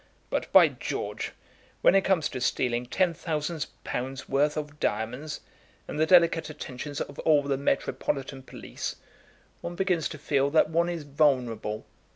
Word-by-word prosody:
But, - - -2
by - - +9
George, - - -4 0.5
when - - +6
it 195 - +5
comes 175 -6 +2
to 130 - -5
stealing 120 -1 0
ten 180 +6 +2
thousand 155 -1 -3 0.2
pounds' 130 +2 -4
worth 145 +2 +2
of 150 -1 -5
diamonds, 125 +8 -2 0.5
and - - -5
the 160 - +3
delicate 170 -2 +5
attentions 145 -1 -6
of - - -6
all 150 -3 +4
the 140 -1 0
metropolitan 135 0 -1
police, - - -6 0.7
one 175 - -5
begins 180 -4 +1
to 155 - -7
feel 140 -1 +1
that 155 +1 +3
one 170 +2 +2
is 170 -3 -3
vulnerable. 125 -7 +1
145 Hz, 155 wpm, -28 LUFS, 135-165 Hz, 0.7 s, by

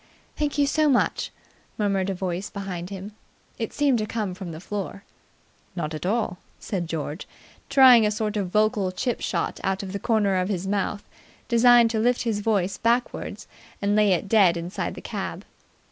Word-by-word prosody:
"Thank 295 0 -2
you 290 - +4
so 305 +2 +2
much," 255 - +1 0.5
murmured 195 -2 0
a 195 - -1
voice 180 +1 -3
behind 185 -3 -5
him. 195 +1 -7 0.5
It 225 - -3
seemed 280 -5 +2
to 215 - -2
come 210 -5 -3
from 185 -2 -7
the 160 - -8
floor. 200 +1 -5 0.7
"Not 160 -3 -3
at 155 +3 -4
all," 205 -4 -1 0.2
said 180 -4 -4
George, 160 +1 -4 0.4
trying 255 -4 +8
a 210 - +3
sort 215 0 -2
of 200 -3 -1
vocal 210 -1 +1
chip 240 +5 -2
shot - - -2
out 195 0 -1
of 190 -1 -6
the 200 - -3
corner 205 -3 +2
of 185 +1 0
his 190 -2 -2
mouth, 200 +1 -2 0.4
designed 235 -1 +6
to 225 - 0
lift 245 +2 +2
his 225 -3 -1
voice 200 -3 0
backwards 235 +2 -1 0.3
and 205 +1 +1
lay 210 -2 +4
it 180 - -1
dead 195 -5 +4
inside 170 +2 -4
the - - -9
cab. - - -5
205 Hz, 180 wpm, -25 LUFS, 185-230 Hz, 0.7 s, trying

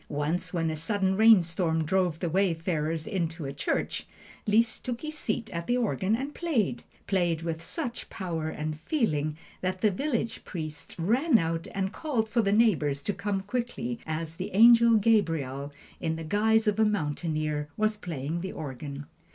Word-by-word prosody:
Once 150 +4 -1
when 165 -3 0
a - - -3
sudden 190 +4 0
rainstorm 175 -6 +4
drove 180 -1 +1
the 175 - 0
wayfarers 165 -3 0
into 170 -6 -2
a 135 - -4
church, 140 - -2 0.4
Liszt 220 +2 +2
took 245 -2 -4
his 310 0 -5
seat 220 -5 -2
at 170 0 -4
the 245 - +2
organ 205 - +1
and 275 +5 -4
played 250 - 0 0.2
played 175 -4 +1
with 165 -1 -3
such 235 +8 -4
power 165 -4 -3
and 155 0 -4
feeling 155 - 0 0.2
that 185 0 -2
the 215 - +4
village 230 +1 -2
priest 155 -4 -6
ran 235 - +3
out 165 -3 -1
and 195 +1 -1
called 250 -8 -1
for 235 +1 +2
the 200 -2 +1
neighbors 160 -11 +3
to 205 - -1
come 200 0 -2
quickly, 240 +2 -3
as 160 +1 -3
the - - -4
Angel 235 +1 +8
Gabriel, 165 - +1 0.3
in 160 0 -1
the 165 - -5
guise 220 +6 +3
of 210 0 +1
a - - +6
mountaineer, 155 -6 -1
was 215 0 +2
playing 165 -4 -4
the 190 - -4
organ. 140 0 -6
185 Hz, 165 wpm, -28 LUFS, 160-220 Hz, 0.4 s, Angel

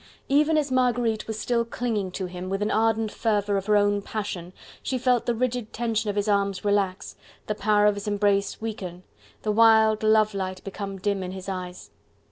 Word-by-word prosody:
Even 300 +3 +3
as 290 -3 0
Marguerite 245 -3 +1
was 220 -1 -4
still 235 +1 0
clinging 230 -4 -2
to 190 - -3
him, 180 +1 -6
with 195 +1 -2
the 210 - 0
ardent 225 0 +1
fervour 205 -2 0
of 195 0 -2
her 210 -1 +4
own 205 0 +2
passion, 195 -5 -5 0.3
she 260 - -2
felt 250 -1 +1
the 240 - +1
rigid 245 -2 -2
tension 225 -2 -1
of 205 - -2
his 205 0 0
arms 200 -1 0
relax, 200 -2 0 0.3
the 210 - -1
power 210 0 +2
of 210 - +5
his 200 +1 -7
embrace 205 -1 +1
weaken, 185 -5 -6 0.4
the 215 - +1
wild 220 0 +5
love 215 -1 +3
light 185 -1 -4
become 195 0 -6
dim 200 0 -1
in 185 0 -5
his 190 0 -8
eyes. 185 -2 -6
210 Hz, 195 wpm, -25 LUFS, 195-225 Hz, 0.4 s, of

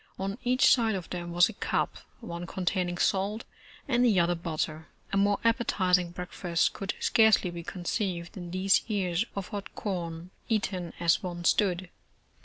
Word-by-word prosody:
On 195 +4 -3
each 255 +1 +3
side 225 -4 +2
of 185 -3 -6
them 175 -1 -4
was 175 +1 +5
a 225 - -7
cup, - - -1 0.3
one 175 -6 -6
containing 180 -1 -1
salt 200 +5 0 0.4
and 245 -3 +2
the 220 -7 +4
other 170 +1 +3
butter. 160 -2 -3 0.3
A - - +2
more 200 0 +3
appetizing 185 -7 +2
breakfast 175 -1 -1
could 195 0 -4
scarcely 220 -5 +4
be 170 0 -6
conceived 175 0 -3
than 175 -3 -7
these 185 +2 +3
ears 195 -2 0
of 195 -2 -4
hot 200 -1 -6
corn, 175 -3 -4 0.2
eaten 190 -6 -1
as 170 -1 +3
one 175 -1 -5
stood. 185 -1 +2
185 Hz, 160 wpm, -29 LUFS, 175-205 Hz, 0.4 s, was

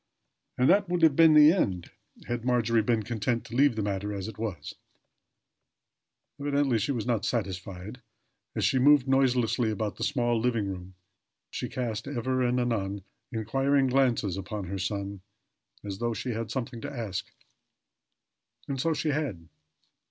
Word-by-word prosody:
And 125 - +3
that 200 -2 +4
would 175 -1 0
have 155 -4 +6
been 160 -1 +7
the 150 0 +9
end 95 - -1 0.3
had 120 -1 -3
Margery 120 -2 +2
been 110 0 +1
content 115 +1 -2
to 115 - -8
leave 140 -1 +4
the 110 - -1
matter 100 0 -2
as 100 0 -4
it 110 - -9
was; 95 -10 -4 1.7
evidently, 140 -4 +1
she 115 +7 -1
was 120 -6 -2
not 115 -4 0
satisfied. 100 +1 -4 0.5
As - - +1
she 130 - +2
moved 140 0 +5
noiselessly 125 -3 +2
about 110 -1 -3
the - - -4
small 120 -5 +1
living 115 -3 0
room 95 -1 -7 0.6
she - - -4
cast, 115 -4 -3
ever 130 -1 -1
and 125 0 +1
anon, 100 -5 -1 0.3
inquiring 135 +5 +1
glances 125 -8 +1
upon 100 +1 -5
her 95 +2 -4
son, 100 0 -3 0.6
as 100 -1 -6
though 120 -1 -1
she 125 - -3
had 115 0 -4
something 120 -3 -4
to - - -5
ask. 110 -8 -4 1.4
And 135 -2 -2
so 165 +1 +1
she 155 - -1
had. 135 - -3
120 Hz, 160 wpm, -28 LUFS, 100-135 Hz, 1.7 s, the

